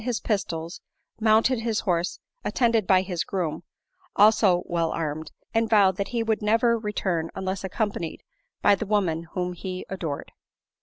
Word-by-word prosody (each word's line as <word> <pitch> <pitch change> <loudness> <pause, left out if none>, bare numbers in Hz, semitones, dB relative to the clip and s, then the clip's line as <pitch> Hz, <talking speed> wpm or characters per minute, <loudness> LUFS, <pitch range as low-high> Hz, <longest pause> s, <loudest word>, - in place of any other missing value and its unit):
101 240 - -3
his 235 - 0
pistols, 170 -5 -3 0.4
mounted 225 +3 +4
his 225 -1 -1
horse, 175 -2 0 0.3
attended 230 -5 +1
by 185 -1 +5
his 180 -3 -2
grodm, 175 -6 -3 0.5
also 205 -4 +5
well 170 -1 0
armed, 155 -1 -3 0.2
and 225 0 +1
vowed 200 -4 +5
that 200 - -1
he 235 -2 -1
would 220 -1 0
never 230 +3 +3
return 190 -7 -2
unless 190 0 -3
accompanied 190 -3 -3 0.4
by 205 - +6
the 205 +1 -2
woman 170 -6 0
whom 180 -1 -2
he 185 +1 -6
adored." 165 -7 -4
195 Hz, 155 wpm, -25 LUFS, 175-220 Hz, 0.5 s, by